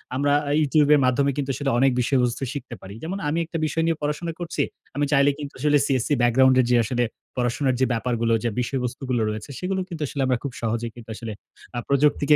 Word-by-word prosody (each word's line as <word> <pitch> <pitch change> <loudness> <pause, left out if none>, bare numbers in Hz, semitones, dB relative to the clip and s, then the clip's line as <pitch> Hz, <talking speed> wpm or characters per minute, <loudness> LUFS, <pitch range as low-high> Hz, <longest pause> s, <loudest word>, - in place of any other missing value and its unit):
আমরা 145 +1 +1 0.2
এ - - +2
YouTube 150 0 +3
এর - - +3
মাধ্যমে 140 +2 +2
কিন্তু 140 -1 -2
আসলে 140 0 -1
অনেক 135 0 +4
বিষয়বস্তু 125 0 +1
শিখতে 130 -4 -6
পারি। 95 +1 -9
যেমন 185 +5 -3
আমি 160 - -1
একটা 165 0 -5
বিষয় 160 +2 0
নিয়ে 165 -1 +1
পড়াশোনা 150 +3 -2
করছি। 165 -4 -1 0.3
আমি 145 0 +1
চাইলে 140 0 +5
কিন্তু 145 -1 -6
আসলে 150 +1 +4
CSC 130 -2 0
ব্যাকগ্রাউন্ড 130 +2 +5
এ - - +1
যে - - +5
আসলে 120 +1 0 0.3
পড়াশোনার 125 +2 +1
যে - - +5
ব্যাপারগুলো 115 -1 0
যে 120 - +1
বিষয়বস্তুগুলো 125 -1 -2
রয়েছে 105 +4 -5
সেগুলো 190 +1 -1
কিন্তু 165 -3 -7
আসলে 140 - -3
আমরা 130 -2 +2
খুব 140 - -3
সহজেই 115 0 -2
কিন্তু 115 -2 -12
আসলে 115 -1 -6 0.5
আ - - +1
প্রযুক্তিকে 145 +1 +4
135 Hz, 210 wpm, -24 LUFS, 120-145 Hz, 0.5 s, চাইলে